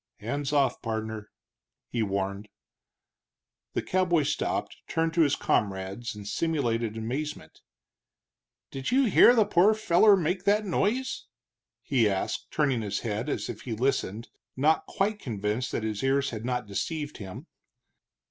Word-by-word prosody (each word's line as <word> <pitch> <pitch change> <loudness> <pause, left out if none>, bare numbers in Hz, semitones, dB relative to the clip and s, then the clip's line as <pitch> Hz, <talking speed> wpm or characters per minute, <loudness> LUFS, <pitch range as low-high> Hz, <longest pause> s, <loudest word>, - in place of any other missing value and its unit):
"Hands 140 +6 -3
off, 140 -4 +2
pardner!" 110 -2 -4 0.6
he 120 - -2
warned. 100 0 -2 1.2
The - - -1
cowboy 180 -4 +2
stopped, 145 - -2
turned 165 0 0
to 170 - +3
his 145 -4 +4
comrades 100 +3 -1
in 105 -1 -9
simulated 115 -4 -1
amazement. 125 - -5 1.1
"Did 135 -1 -4
you 270 +2 +4
hear 240 +2 +7
the 220 -3 +5
pore 205 +2 +4
feller 210 0 +5
make 180 +2 -1
that 210 +1 +3
noise?" 225 +8 -1 0.6
he 120 -6 +2
asked, 95 -1 -2
turning 135 -6 +1
his 100 -2 -3
head 110 +4 -3
as - - -2
if - - -6
he 120 - -4
listened, 115 -2 -1 0.3
not 155 +4 +2
quite 205 +2 -1
convinced 110 - -2
that - - -2
his 110 -2 -2
ears 135 +1 +1
had 110 -1 -6
not 125 -1 -1
deceived 145 - -4
him. 95 -4 -8
130 Hz, 140 wpm, -28 LUFS, 110-165 Hz, 1.2 s, hear